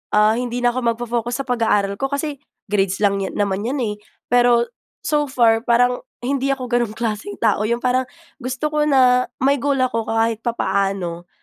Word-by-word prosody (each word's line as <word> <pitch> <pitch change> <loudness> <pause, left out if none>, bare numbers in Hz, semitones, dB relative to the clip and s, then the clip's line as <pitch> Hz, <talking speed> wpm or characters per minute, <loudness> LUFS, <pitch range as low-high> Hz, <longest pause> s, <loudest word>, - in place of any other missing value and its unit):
ah, 210 +1 +5
hindi 245 +1 -3
na 240 - +5
ako 255 - -1 0.2
magfo-focus 240 +2 -2
sa - - -23
pag-aaral 220 -5 +1
ko 270 - 0
kasi, 285 0 -3 0.2
grades 195 -2 0
lang 200 -1 +2
yan 190 - -4
naman 200 -1 0
'yan 255 +6 -2
eh. 210 -2 -2 0.4
ero, 240 -1 +5 0.4
so 295 -2 +1
far 230 -4 +3
parang, 245 +1 +2 0.2
hindi 275 +1 0
ako 270 -2 -1
gano'n 240 -3 0
klaseng 210 -3 -3
tao, 215 -2 +1
'yong 235 +1 -1
parang, 255 0 +1 0.3
gusto 260 +4 -2
ko 300 - +2
na, 255 -2 +4 0.2
may 280 +1 +3
goal 280 -1 +1
ako 235 -4 0
kahit 225 0 +1
papaano, 195 -7 -1
240 Hz, 180 wpm, -20 LUFS, 210-255 Hz, 0.4 s, ah